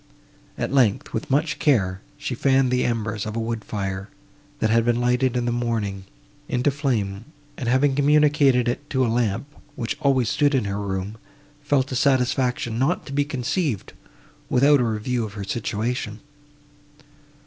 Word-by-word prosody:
At - - -2
length, 125 -7 +2
with 110 - -3
much 150 +4 +1
care, 95 -10 +2 0.2
she 145 -3 -4
fanned 135 0 +2
the 125 0 +2
embers 110 -3 -1
of 110 - -5
a - - -1
wood 115 -1 -3
fire, 95 -1 -4 0.5
that 110 -5 +1
had 115 0 +4
been 120 0 +1
lighted 125 +1 +1
in 120 - -1
the 120 - 0
morning, 110 -5 -2 0.4
into 125 +3 +1
flame, 115 -8 -2 0.3
and, 120 -4 -3
having 135 +3 +3
communicated 145 -3 +4
it 135 +4 -3
to 130 -2 +1
a 115 - 0
lamp, 115 0 0 0.3
which 115 -2 -3
always 130 -4 +2
stood 145 +5 +2
in 125 - +1
her 100 0 -2
room, 100 +1 -4 0.4
felt 140 -2 +1
a - - -2
satisfaction 125 -3 +1
not 145 +8 +1
to 140 - -8
be 145 +1 +2
conceived, 135 - -2 0.6
without 140 +3 +5
a - - +2
review 115 +2 -1
of 105 -2 -6
her 105 -1 -5
situation. 110 +1 -3
120 Hz, 165 wpm, -23 LUFS, 110-135 Hz, 0.6 s, without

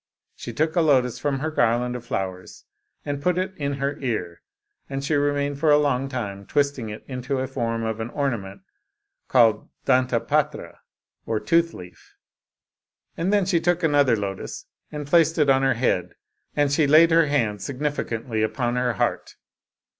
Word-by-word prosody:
She - - -7
took 155 +1 -1
a 175 - +4
lotus 130 -6 +2
from 140 -2 -1
her 155 +2 -2
garland 125 -2 +1
of 125 - -6
flowers, 95 -6 -5 0.4
and 145 -1 -3
put 180 +3 +1
it 185 +1 -2
in 140 -3 -2
her 140 +1 -3
ear, 105 -10 -3 0.5
and 135 0 -4
she 145 - -1
remained 145 -1 0
for 155 0 +2
a 145 - +7
long 135 -2 0
time 100 -7 -5
twisting 140 -6 0
it 105 - -9
into 130 +1 -3
the 130 - -1
form 115 -3 -2
of 110 0 -3
an 110 +1 -4
ornament 115 - -3 0.7
called 115 -4 +3 0.2
dantapatra 125 -3 0 0.5
or 110 -1 0
tooth 165 +4 +1
leaf, 90 -1 -13 1.0
and 175 +4 -1
then 205 -2 +3
she 180 -2 +2
took 175 +1 +1
another 145 -6 +4
lotus 100 -2 -5 0.3
and 150 -1 -5
placed 160 +2 +3
it 150 -3 +4
on 135 0 +3
her 135 -2 +2
head, 90 -7 0 0.4
and 145 -1 +2
she 145 0 +3
laid 160 +3 +6
her 165 -1 +5
hand 115 -8 0
significantly 125 -5 -3
upon 120 +2 -1
her 125 -1 +1
heart. 100 - -2
135 Hz, 170 wpm, -24 LUFS, 115-145 Hz, 1.0 s, a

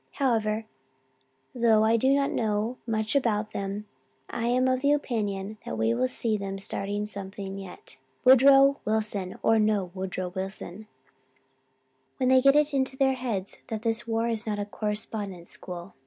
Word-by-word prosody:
However, 225 -5 0 0.9
though 230 -3 +4
I 220 +1 +4
do 260 +4 +3
not 275 0 +2
know 220 +2 -1
much 220 +1 0
about 215 -5 +1
them, 200 +1 -4 0.5
I 235 0 -2
am 255 +2 +2
of 255 0 +1
the 285 +1 +4
opinion 210 -7 -2
that 110 - -5
we 110 +1 +2
will 125 +2 +1
see 220 - -1
them 195 -1 -4
starting 200 +1 -3
something 195 -1 -6
yet, 190 -8 -10 0.3
Woodrow 270 +2 +7
Wilson 210 -3 -2
or 225 0 +4
no 210 -4 +1
Woodrow 185 -1 -4
Wilson, 190 +2 -6 1.3
when 255 -2 +1
they 260 0 +6
get 275 +1 +5
it 300 0 +3
into 265 -1 +1
their 265 -1 +3
heads 230 -7 -4
that 220 -1 -4
this 230 0 -1
war 225 0 0
is 225 -1 -2
not 210 -1 -1
a 205 - -2
correspondence 210 -3 -4
school. 180 +1 -8
215 Hz, 160 wpm, -27 LUFS, 195-245 Hz, 1.3 s, Woodrow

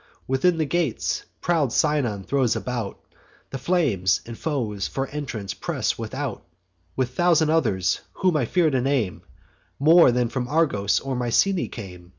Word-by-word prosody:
Within 150 +7 +2
the 160 - +1
gates, 160 -5 -1 0.2
proud 160 -7 +1
Sinon 130 -11 +1
throws 130 0 +1
about 120 -5 -4 0.5
The 135 - -4
flames; 120 - +1
and 115 - -7
foes 115 -10 -2
for 135 - -2
entrance 130 -9 -5
press - - -2
without, - - -4 0.5
With 125 -1 -1
thousand 160 +1 +3
others, 95 - +1
whom 185 -3 +1
I 140 -5 +2
fear 165 +5 +2
to 130 -2 +1
name, 125 -8 0 0.6
More 160 0 +6
than 125 0 +1
from 125 +1 -3
Argos 135 -10 +1
or 135 -1 -4
Mycenae 125 +10 +1
came. 90 -6 -10
130 Hz, 150 wpm, -24 LUFS, 110-155 Hz, 0.6 s, More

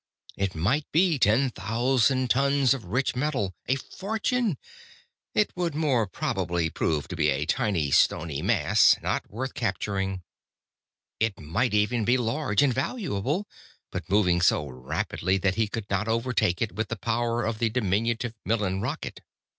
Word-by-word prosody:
It 100 -2 -2
might 115 - 0
be 165 -2 +3
ten 125 +5 +3
thousand 125 +4 +1
tons 140 0 +3
of 130 -7 -6
rich 125 +10 -1
metal. 125 -8 -1
A 130 - +2
fortune! 215 - -2 0.8
It 210 - +2
would 175 -4 -2
more 135 -8 +1
probably 85 -3 -1
prove 75 -3 -1
to 90 - -4
be 75 -2 +2
a 70 +2 0
tiny, 95 - 0
stony 80 0 +2
mass, - - +4
not - - -2
worth 130 +5 -4
capturing. 95 -3 -2 1.0
It 110 -2 0
might 105 +10 0
even 110 +2 +2
be 120 +4 +3
large 115 -1 +1
and 135 -3 +3
valuable, 150 - -2 0.4
but - - -5
moving 90 -3 +3
so 75 -3 +3
rapidly 65 +8 -2
that 95 0 +1
he 110 +2 0
could 105 0 -5
not 100 +2 -1
overtake 115 -5 +1
it 110 - -3
with 110 0 -3
the 115 - -3
power 115 +2 -1
of 110 -1 -2
the 115 -1 +2
diminutive 115 +1 0
Millen 100 -4 0
rocket. 135 +8 -4
115 Hz, 155 wpm, -26 LUFS, 95-130 Hz, 1.0 s, mass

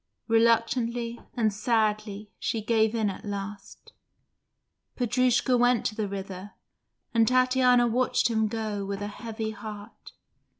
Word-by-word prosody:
Reluctantly 230 +1 +1 0.2
and 220 -3 +1
sadly 215 -1 -1
she 225 - -1
gave 220 0 +1
in 220 -2 +1
at 195 - -5
last. 200 -1 -7 1.0
Petrushka 250 +1 +2
went 245 -1 +3
to - - 0
the 215 -1 -2
river, 195 0 -7 0.6
and 225 -1 +4
Tatiana 255 -1 +4
watched 240 +1 +2
him 220 -2 +1
go 215 -2 -3
with 200 +1 -4
a - - -3
heavy 220 +1 -5
heart. 210 0 -10
220 Hz, 125 wpm, -27 LUFS, 205-235 Hz, 1.0 s, and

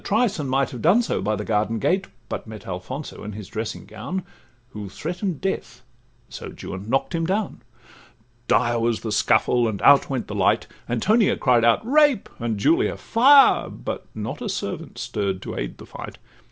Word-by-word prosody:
trice, 215 -2 +1
And 140 -3 -3
might 135 0 +1
have 125 - -7
done 195 +10 +4
so - - -1
by 105 +2 0
the 105 0 -5
garden 110 +1 0
gate, 185 - +1 0.2
But - - -5
met 110 -1 -9
Alfonso 95 +11 -6
in 105 0 -6
his 105 -2 -8
dressing 110 -1 -5
gown, 175 - -5 0.5
Who 105 -5 -7
threaten'd 175 - -4
death—so 120 -8 -7
Juan 95 +3 -6
knock'd 135 +7 0
him 165 -1 0
down. 200 +2 -2 0.9
Dire 120 0 +2
was 115 -1 0
the 110 - -4
scuffle, 120 +2 +3
and 105 -3 -3
out 140 -1 +6
went 130 -3 -2
the - - -7
light; 100 -3 +2 0.2
Antonia 205 - +2
cried 125 -4 +3
out 115 - +3
'Rape!' 290 -3 +3
and 115 -3 -2
Julia 130 +11 +2
'Fire!' 275 +4 +5
But - - -6
not - - -5
a - - -3
servant - - -5
stirr'd 95 -2 -2
to - - -6
aid - - -4
the - - -11
fight. - - -9
120 Hz, 180 wpm, -23 LUFS, -, 0.9 s, out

